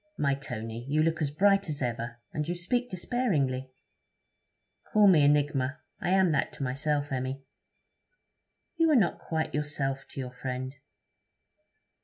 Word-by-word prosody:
'My 140 Hz, -1 st, +2 dB
Tony, 115 Hz, -4 st, -5 dB
you 155 Hz, +2 st, +3 dB
look 165 Hz, 0 st, 0 dB
as 145 Hz, -, +1 dB
bright 195 Hz, +4 st, +3 dB
as 145 Hz, -2 st, -3 dB
ever, 120 Hz, -2 st, -3 dB, 0.2 s
and 150 Hz, 0 st, -2 dB
you 175 Hz, -, -1 dB
speak 245 Hz, +8 st, -1 dB
despairingly.' 155 Hz, -, -1 dB, 1.1 s
'Call 210 Hz, -1 st, +4 dB
me 165 Hz, -6 st, +6 dB
enigma. 145 Hz, -2 st, +2 dB, 0.2 s
I -, -, -2 dB
am 190 Hz, -2 st, +4 dB
that 150 Hz, -, +1 dB
to -, -, -5 dB
myself, 145 Hz, +2 st, -1 dB
Emmy.' 130 Hz, +1 st, -3 dB, 1.3 s
'You 330 Hz, -1 st, +4 dB
are 305 Hz, -, +5 dB
not 200 Hz, -9 st, +3 dB
quite 160 Hz, -1 st, -2 dB
yourself 145 Hz, -2 st, -2 dB
to -, -, -9 dB
your 125 Hz, -2 st, -4 dB
friend.' 130 Hz, +1 st, -4 dB
145 Hz, 145 wpm, -29 LUFS, 130-175 Hz, 1.3 s, me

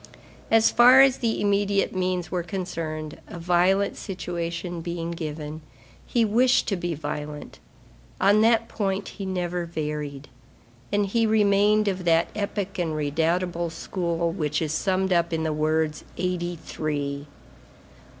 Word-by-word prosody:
As 225 Hz, 0 st, +5 dB
far 250 Hz, +2 st, +8 dB
as 270 Hz, -1 st, +5 dB
the 230 Hz, -2 st, -1 dB
immediate 200 Hz, -1 st, +1 dB
means 180 Hz, -2 st, -1 dB
were 180 Hz, -, 0 dB
concerned, 165 Hz, -4 st, -5 dB
a -, -, -8 dB
violent 180 Hz, +3 st, +2 dB
situation 175 Hz, -2 st, -4 dB
being 170 Hz, 0 st, -4 dB
given, 155 Hz, -2 st, -5 dB, 0.5 s
he 235 Hz, -2 st, +2 dB
wished 245 Hz, +5 st, +3 dB
to 200 Hz, -, +1 dB
be 175 Hz, -2 st, -3 dB
violent; 150 Hz, 0 st, -6 dB, 0.6 s
on 205 Hz, +2 st, +5 dB
that 230 Hz, 0 st, +3 dB
point, 195 Hz, -3 st, -2 dB
he 195 Hz, -2 st, -7 dB
never 180 Hz, -2 st, -2 dB
varied; 150 Hz, -3 st, -4 dB, 0.6 s
and 205 Hz, 0 st, +2 dB
he 225 Hz, +3 st, +1 dB
remained 210 Hz, 0 st, +3 dB
of 190 Hz, -2 st, -1 dB
that 165 Hz, 0 st, +3 dB
epic 200 Hz, -2 st, -3 dB
and 165 Hz, -3 st, -1 dB
redoubtable 165 Hz, +4 st, 0 dB
school 170 Hz, 0 st, -2 dB
which 150 Hz, -4 st, -1 dB
is 155 Hz, -2 st, -2 dB
summed 190 Hz, +2 st, +1 dB
up 170 Hz, 0 st, +2 dB
in 160 Hz, -1 st, -1 dB
the 160 Hz, -1 st, 0 dB
words: 155 Hz, 0 st, 0 dB
"Eighty 175 Hz, -1 st, -2 dB
three." 145 Hz, -3 st, -4 dB
175 Hz, 140 wpm, -25 LUFS, 160-200 Hz, 0.6 s, far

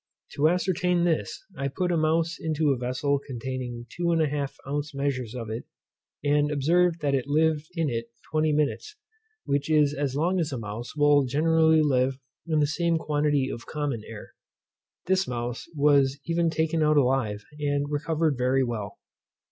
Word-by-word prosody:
To 150 Hz, +2 st, +3 dB
ascertain 180 Hz, 0 st, +1 dB
this, 175 Hz, -, -1 dB
I 140 Hz, -, -2 dB
put 180 Hz, +6 st, -1 dB
a -, -, +2 dB
mouse 165 Hz, +1 st, +1 dB
into 155 Hz, -2 st, +1 dB
a -, -, +2 dB
vessel 130 Hz, +3 st, -1 dB
containing 125 Hz, -2 st, -5 dB
2 175 Hz, -, -3 dB
1/2 150 Hz, -4 st, 0 dB
ounce 145 Hz, +1 st, -3 dB
measures 130 Hz, -4 st, -2 dB
of 115 Hz, -3 st, -5 dB
it, 115 Hz, +2 st, -5 dB, 0.6 s
and 145 Hz, 0 st, +2 dB
observed 165 Hz, +4 st, +2 dB
that 145 Hz, -2 st, +1 dB
it 135 Hz, -1 st, 0 dB
lived 155 Hz, +1 st, +1 dB
in 165 Hz, -2 st, 0 dB
it 115 Hz, -3 st, -2 dB, 0.3 s
twenty 155 Hz, 0 st, +2 dB
minutes, 150 Hz, -, -1 dB, 0.5 s
which 140 Hz, +2 st, -1 dB
is 150 Hz, -2 st, +4 dB
as 140 Hz, -2 st, -2 dB
long 175 Hz, +5 st, +1 dB
as 160 Hz, -4 st, -1 dB
a 130 Hz, -, -3 dB
mouse 115 Hz, +3 st, -6 dB
will 145 Hz, -1 st, +4 dB
generally 160 Hz, +3 st, +3 dB
live 130 Hz, -2 st, +1 dB, 0.3 s
in 160 Hz, -2 st, +1 dB
the -, -, +4 dB
same 165 Hz, +3 st, 0 dB
quantity 145 Hz, -3 st, +1 dB
of 115 Hz, -, -8 dB
common 145 Hz, -7 st, -3 dB
air. 110 Hz, -2 st, -10 dB, 0.7 s
This 190 Hz, +1 st, +1 dB
mouse 120 Hz, 0 st, -4 dB
was 140 Hz, -2 st, +3 dB
even 170 Hz, 0 st, +1 dB
taken 160 Hz, 0 st, 0 dB
out 155 Hz, 0 st, +3 dB
alive, 125 Hz, -6 st, +1 dB, 0.2 s
and 145 Hz, -1 st, 0 dB
recovered 155 Hz, -1 st, 0 dB
very 130 Hz, +2 st, +2 dB
well. 110 Hz, -4 st, -4 dB
145 Hz, 165 wpm, -26 LUFS, 130-160 Hz, 0.7 s, is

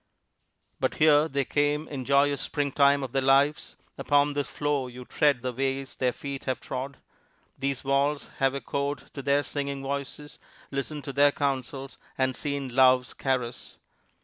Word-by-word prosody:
But -, -, 0 dB
here 150 Hz, 0 st, +5 dB
they 140 Hz, -3 st, -1 dB
came 145 Hz, +2 st, 0 dB
in 140 Hz, -, -5 dB
the 130 Hz, -, -6 dB
joyous 140 Hz, 0 st, +3 dB
springtime 140 Hz, -1 st, +2 dB
of 130 Hz, -, -5 dB
their 135 Hz, -, +1 dB
lives; 140 Hz, +3 st, +2 dB, 0.2 s
upon 145 Hz, 0 st, +3 dB
this 145 Hz, -1 st, -2 dB
floor 145 Hz, -3 st, -1 dB
you 125 Hz, 0 st, -10 dB
tread 140 Hz, -4 st, +2 dB
the 125 Hz, -1 st, -2 dB
ways 135 Hz, +1 st, -2 dB
their 125 Hz, -1 st, +1 dB
feet 140 Hz, +1 st, -7 dB
have 130 Hz, -1 st, -1 dB
trod; 135 Hz, +1 st, -5 dB, 0.6 s
these 135 Hz, 0 st, -2 dB
walls 140 Hz, +2 st, 0 dB
have 135 Hz, 0 st, +2 dB
echoed 140 Hz, +2 st, -3 dB
to 140 Hz, -, -6 dB
their 140 Hz, +1 st, +2 dB
singing 140 Hz, -1 st, -4 dB
voices, 140 Hz, +1 st, -5 dB, 0.3 s
listened 145 Hz, +1 st, -4 dB
to 140 Hz, -, -6 dB
their 145 Hz, +1 st, +5 dB
counsels, 135 Hz, -2 st, -3 dB, 0.2 s
and 130 Hz, -1 st, +1 dB
seen 140 Hz, -1 st, -3 dB
love's 130 Hz, 0 st, +4 dB
caress. 125 Hz, -3 st, -3 dB
140 Hz, 160 wpm, -27 LUFS, 130-145 Hz, 0.6 s, here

